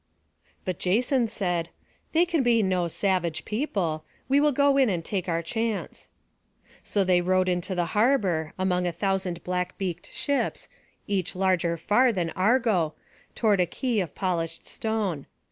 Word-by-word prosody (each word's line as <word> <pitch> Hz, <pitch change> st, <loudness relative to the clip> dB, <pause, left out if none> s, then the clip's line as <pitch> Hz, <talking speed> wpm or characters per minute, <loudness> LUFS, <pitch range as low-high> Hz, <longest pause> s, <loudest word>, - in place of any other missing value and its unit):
But 185 Hz, -2 st, -3 dB
Jason 240 Hz, +6 st, +2 dB
said: 175 Hz, -5 st, -1 dB, 0.4 s
"They 335 Hz, +2 st, +4 dB
can 335 Hz, -4 st, +1 dB
be 235 Hz, -3 st, +3 dB
no 185 Hz, -2 st, +1 dB
savage 175 Hz, -2 st, -1 dB
people. 195 Hz, -, -2 dB, 0.2 s
We 275 Hz, +2 st, +4 dB
will 300 Hz, 0 st, +4 dB
go 280 Hz, +1 st, +3 dB
in 265 Hz, -4 st, +4 dB
and 170 Hz, -4 st, -2 dB
take 190 Hz, -3 st, -2 dB
our 165 Hz, 0 st, 0 dB
chance." 225 Hz, +4 st, -3 dB, 0.7 s
So 200 Hz, -, 0 dB
they 180 Hz, -1 st, +3 dB
rowed 185 Hz, +1 st, +2 dB
into 180 Hz, +1 st, -1 dB
the 175 Hz, -1 st, +1 dB
harbour, 205 Hz, -, +2 dB
among 180 Hz, -1 st, +1 dB
a -, -, 0 dB
thousand 185 Hz, -1 st, -2 dB
black 180 Hz, 0 st, -2 dB
beaked 180 Hz, -2 st, -4 dB
ships, 285 Hz, -1 st, -1 dB, 0.4 s
each 195 Hz, -2 st, -2 dB
larger 180 Hz, -3 st, +1 dB
far 245 Hz, +9 st, +3 dB
than 175 Hz, -6 st, -2 dB
Argo, 200 Hz, -5 st, +2 dB, 0.4 s
toward 210 Hz, -4 st, +2 dB
a 180 Hz, -, +2 dB
quay 240 Hz, +4 st, -1 dB
of 175 Hz, -6 st, -3 dB
polished 165 Hz, -4 st, -2 dB
stone. 210 Hz, -10 st, -2 dB
185 Hz, 155 wpm, -26 LUFS, 175-225 Hz, 0.7 s, They